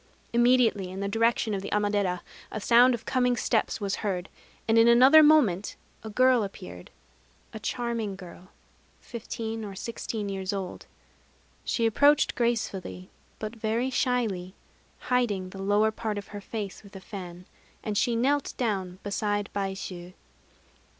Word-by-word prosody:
Immediately, 240 Hz, -5 st, +3 dB
in 190 Hz, +1 st, -7 dB
the 200 Hz, -, -2 dB
direction 225 Hz, +1 st, +1 dB
of 195 Hz, -, -2 dB
the 200 Hz, -, -6 dB
Amadera, 205 Hz, -3 st, 0 dB, 0.3 s
a 215 Hz, -, -4 dB
sound 240 Hz, +4 st, +5 dB
of 225 Hz, -, -11 dB
coming 250 Hz, -1 st, +1 dB
steps 230 Hz, -1 st, 0 dB
was 200 Hz, -2 st, -2 dB
heard; 190 Hz, -3 st, -3 dB, 0.4 s
and 225 Hz, 0 st, +4 dB
in 225 Hz, -, +6 dB
another 260 Hz, +6 st, +8 dB
moment 270 Hz, -, +4 dB, 0.3 s
a 220 Hz, -, -6 dB
girl 255 Hz, +2 st, +4 dB
appeared, 90 Hz, -, -8 dB, 0.6 s
a 220 Hz, -, -6 dB
charming 230 Hz, -3 st, -2 dB
girl, 180 Hz, -1 st, -12 dB, 0.5 s
fifteen 225 Hz, -1 st, -6 dB
or 200 Hz, -2 st, -7 dB
sixteen 220 Hz, 0 st, -4 dB
years 195 Hz, -1 st, -3 dB
old. 190 Hz, -2 st, -5 dB, 0.8 s
She 230 Hz, -, 0 dB
approached 285 Hz, +6 st, +4 dB
gracefully, 215 Hz, -6 st, -2 dB, 0.3 s
but 215 Hz, +2 st, -6 dB
very 230 Hz, +3 st, -1 dB
shyly, 220 Hz, -9 st, -1 dB, 0.5 s
hiding 210 Hz, -7 st, 0 dB
the 195 Hz, -, -8 dB
lower 205 Hz, +2 st, +3 dB
part 215 Hz, -1 st, -4 dB
of 200 Hz, -, -7 dB
her 205 Hz, -1 st, -7 dB
face 205 Hz, -2 st, -6 dB
with 200 Hz, -1 st, -16 dB
a -, -, -7 dB
fan; 180 Hz, -3 st, -9 dB, 0.4 s
and 210 Hz, -2 st, -3 dB
she 235 Hz, +3 st, +2 dB
knelt 275 Hz, +5 st, +1 dB
down 190 Hz, -7 st, -2 dB
beside 205 Hz, 0 st, -2 dB
Baishû. 190 Hz, -2 st, -4 dB
210 Hz, 145 wpm, -27 LUFS, 195-235 Hz, 0.8 s, another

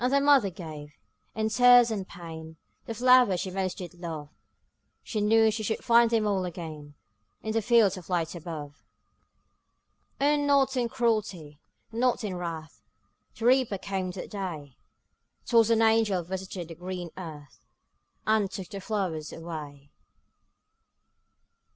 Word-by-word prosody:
And 250 Hz, -, +2 dB
the 280 Hz, -, +4 dB
mother 280 Hz, -7 st, +4 dB
gave, 155 Hz, -5 st, -9 dB, 0.4 s
in 220 Hz, 0 st, 0 dB
tears 245 Hz, +1 st, +6 dB
and 195 Hz, -3 st, -3 dB
pain, 160 Hz, -2 st, -10 dB, 0.3 s
The 230 Hz, -, -4 dB
flowers 250 Hz, -6 st, +5 dB
she 190 Hz, -, -4 dB
most 185 Hz, -1 st, -2 dB
did 180 Hz, -1 st, -7 dB
love; 165 Hz, -4 st, -7 dB, 0.7 s
She 215 Hz, -, -3 dB
knew 220 Hz, +1 st, +4 dB
she 220 Hz, +1 st, -3 dB
should 220 Hz, +1 st, -2 dB
find 235 Hz, 0 st, +5 dB
them 225 Hz, -2 st, +1 dB
all 195 Hz, -3 st, +1 dB
again 160 Hz, -4 st, -7 dB, 0.5 s
In 220 Hz, -, -2 dB
the 225 Hz, +1 st, +1 dB
fields 220 Hz, -3 st, +4 dB
of 180 Hz, -, -11 dB
light 170 Hz, -3 st, -1 dB
above. 155 Hz, -4 st, -8 dB, 1.4 s
O, 290 Hz, +2 st, +3 dB
not 280 Hz, -2 st, +2 dB
in 245 Hz, -2 st, 0 dB
cruelty, 210 Hz, -, -1 dB, 0.3 s
not 240 Hz, +1 st, +1 dB
in 205 Hz, -3 st, -3 dB
wrath, 165 Hz, -3 st, -6 dB, 0.6 s
The 225 Hz, -, -4 dB
Reaper 250 Hz, -5 st, +3 dB
came 190 Hz, -1 st, -3 dB
that 185 Hz, -, -8 dB
day; 165 Hz, -9 st, -6 dB, 0.7 s
'Twas 230 Hz, -2 st, +4 dB
an 225 Hz, -1 st, +4 dB
angel 220 Hz, -5 st, +3 dB
visited 185 Hz, -1 st, -6 dB
the -, -, -7 dB
green 180 Hz, 0 st, -6 dB
earth, 155 Hz, -6 st, -10 dB, 0.7 s
And 215 Hz, -2 st, +2 dB
took 185 Hz, -2 st, -7 dB
the 195 Hz, -, -7 dB
flowers 185 Hz, -8 st, -3 dB
away. 150 Hz, -4 st, -8 dB
190 Hz, 145 wpm, -27 LUFS, 165-225 Hz, 1.4 s, tears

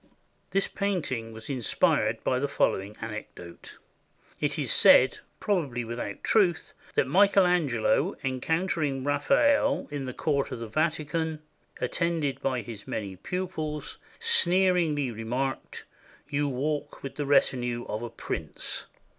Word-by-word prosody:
This 195 Hz, 0 st, +1 dB
painting 155 Hz, -, -2 dB
was 110 Hz, 0 st, -8 dB
inspired 130 Hz, -6 st, +1 dB
by 125 Hz, -, +1 dB
the 145 Hz, -, 0 dB
following 100 Hz, -5 st, 0 dB
anecdote. 105 Hz, -6 st, -8 dB, 0.6 s
It -, -, 0 dB
is -, -, +2 dB
said, -, -, +6 dB, 0.2 s
probably 145 Hz, -, -1 dB
without 115 Hz, -3 st, -5 dB
truth, 185 Hz, -7 st, +2 dB, 0.2 s
that -, -, +3 dB
Michael 195 Hz, +6 st, +5 dB
Angelo, 150 Hz, -11 st, +1 dB
en 130 Hz, -1 st, -2 dB
countering 160 Hz, -5 st, 0 dB
Raphael 280 Hz, -, +2 dB
in 145 Hz, -2 st, -4 dB
the 130 Hz, -, -5 dB
court 140 Hz, -3 st, 0 dB
of -, -, -4 dB
the 115 Hz, 0 st, -6 dB
Vatican, 155 Hz, +3 st, -1 dB, 0.4 s
attended 160 Hz, -6 st, -1 dB
by 130 Hz, -4 st, -1 dB
his 110 Hz, -4 st, -9 dB
many 100 Hz, -3 st, -4 dB
pupils, 155 Hz, -, -4 dB, 0.2 s
sneeringly 180 Hz, -, +4 dB
remarked, 120 Hz, +4 st, -4 dB, 0.4 s
"You 145 Hz, 0 st, 0 dB
walk 145 Hz, +3 st, -3 dB
with 135 Hz, -, -5 dB
the 145 Hz, -2 st, -4 dB
retinue 125 Hz, -4 st, +2 dB
of 105 Hz, -, -3 dB
a 120 Hz, -, -5 dB
prince." -, -, -4 dB
145 Hz, 130 wpm, -27 LUFS, 120-170 Hz, 0.6 s, said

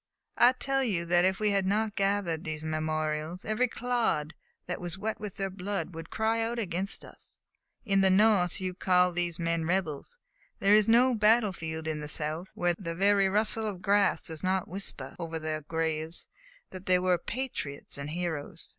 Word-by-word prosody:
I 245 Hz, +2 st, +7 dB
tell 270 Hz, +1 st, 0 dB
you 185 Hz, -9 st, -1 dB
that 175 Hz, +1 st, +3 dB
if 190 Hz, +1 st, +1 dB
we 210 Hz, -1 st, +2 dB
had 195 Hz, -1 st, +1 dB
not 210 Hz, +1 st, 0 dB
gathered 195 Hz, -5 st, 0 dB
these 155 Hz, -1 st, -5 dB
memorials, 155 Hz, +2 st, -2 dB
every 215 Hz, +4 st, +1 dB
clod 235 Hz, -11 st, -1 dB, 0.3 s
that 180 Hz, -, -4 dB
was 175 Hz, 0 st, -3 dB
wet 215 Hz, +3 st, -3 dB
with 210 Hz, -3 st, -6 dB
their 195 Hz, -1 st, -3 dB
blood 195 Hz, 0 st, -4 dB
would 165 Hz, 0 st, -8 dB
cry 220 Hz, +1 st, 0 dB
out 230 Hz, +1 st, -2 dB
against 195 Hz, -3 st, -3 dB
us! -, -, -15 dB, 0.5 s
In 195 Hz, -3 st, +3 dB
the 190 Hz, -, +5 dB
North 190 Hz, -2 st, +4 dB
you 185 Hz, -1 st, -3 dB
call 180 Hz, -1 st, +3 dB
these 175 Hz, -1 st, -2 dB
men 165 Hz, -1 st, -1 dB
rebels; 175 Hz, -, -2 dB, 0.4 s
there 200 Hz, +1 st, +4 dB
is 215 Hz, +1 st, +5 dB
no 250 Hz, +3 st, +5 dB
battlefield 205 Hz, -8 st, +2 dB
in 155 Hz, -1 st, -2 dB
the 150 Hz, -, -5 dB
South 155 Hz, +4 st, -1 dB
where 175 Hz, 0 st, +1 dB
the 170 Hz, -2 st, -6 dB
very 195 Hz, +1 st, +4 dB
rustle 215 Hz, +2 st, 0 dB
of 205 Hz, -, -3 dB
the 180 Hz, -, -14 dB
grass 200 Hz, -1 st, +2 dB
does 160 Hz, -2 st, -5 dB
not 185 Hz, 0 st, 0 dB
whisper 165 Hz, -8 st, -5 dB
over 165 Hz, -1 st, -4 dB
their 155 Hz, -1 st, -3 dB
graves 160 Hz, +1 st, -3 dB, 0.4 s
that 185 Hz, 0 st, -10 dB
they 185 Hz, 0 st, +5 dB
were 180 Hz, -1 st, +2 dB
patriots 230 Hz, -, -5 dB
and 140 Hz, +1 st, -5 dB
heroes! 165 Hz, -3 st, -4 dB
185 Hz, 185 wpm, -29 LUFS, 160-210 Hz, 0.5 s, I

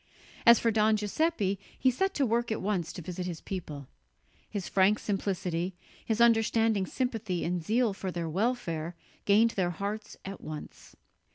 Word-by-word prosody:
As 235 Hz, 0 st, +10 dB
for 230 Hz, -, +2 dB
Don 215 Hz, 0 st, +3 dB
Giuseppe, 210 Hz, -, 0 dB, 0.2 s
he 260 Hz, -, +3 dB
set 385 Hz, +9 st, 0 dB
to 280 Hz, -, +2 dB
work 235 Hz, 0 st, 0 dB
at 220 Hz, -, -1 dB
once 185 Hz, -4 st, -1 dB
to 175 Hz, -, -8 dB
visit 180 Hz, +2 st, -4 dB
his 170 Hz, -3 st, -5 dB
people. 150 Hz, -8 st, -6 dB, 0.6 s
His 200 Hz, -4 st, -4 dB
frank 195 Hz, +2 st, +4 dB
simplicity, 185 Hz, -4 st, -2 dB, 0.3 s
his 225 Hz, 0 st, -1 dB
understanding 225 Hz, -3 st, +3 dB
sympathy 225 Hz, -8 st, -2 dB
and 175 Hz, -1 st, -1 dB
zeal 225 Hz, +3 st, +2 dB
for 195 Hz, -1 st, -4 dB
their 170 Hz, -1 st, -3 dB
welfare 170 Hz, -4 st, -1 dB, 0.3 s
gained 220 Hz, +3 st, +5 dB
their 185 Hz, -4 st, 0 dB
hearts 200 Hz, +5 st, -5 dB
at 195 Hz, 0 st, -7 dB
once. 155 Hz, -1 st, -9 dB
200 Hz, 160 wpm, -29 LUFS, 180-225 Hz, 0.6 s, As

